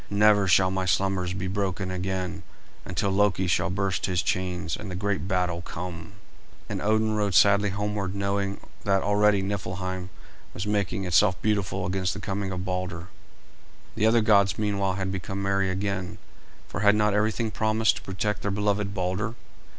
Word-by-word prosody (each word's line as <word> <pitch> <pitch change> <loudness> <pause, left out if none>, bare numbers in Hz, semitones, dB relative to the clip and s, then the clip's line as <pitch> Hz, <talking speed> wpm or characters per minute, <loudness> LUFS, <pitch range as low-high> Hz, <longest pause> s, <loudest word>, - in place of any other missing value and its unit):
"Never 105 -1 +4
shall 95 0 +4
my 95 0 -1
slumbers 95 0 +1
be 95 0 -3
broken 95 -1 -2
again 95 0 -3 0.4
until 95 +1 -1
Loki 95 -2 +2
shall 90 - +1
burst 95 0 -1
his 90 -2 0
chains 90 -4 -1
and 100 - -7
the 90 - -5
great 100 0 -1
battle 90 -3 0
come." 85 0 -7 0.5
And - - -4
Odin 110 +1 +2
rode 100 -3 0
sadly 100 +3 +5
homeward 100 -1 -2
knowing 100 0 -1 0.2
that 100 -1 +2
already 105 -1 +3
Niflheim 95 -2 -4 0.5
was 90 - -3
making 100 -2 -1
itself 90 +1 +3
beautiful 100 -3 0
against 95 0 -1
the - - -5
coming 100 0 -3
of 90 0 -4
Balder. 90 -2 -4 0.8
The 110 0 +2
other 115 +1 +4
gods 100 -4 +4
meanwhile 100 -3 0
had 95 0 -2
become 95 +1 -4
merry 100 -1 +1
again; 95 -1 -3 0.5
for - - -5
had 105 0 +5
not 105 -1 +2
everything 110 +2 0
promised 110 +1 +2
to - - -8
protect 100 +2 -2
their 100 - -1
beloved 100 0 0
Balder? 95 +5 -2
95 Hz, 165 wpm, -26 LUFS, 95-105 Hz, 0.8 s, sadly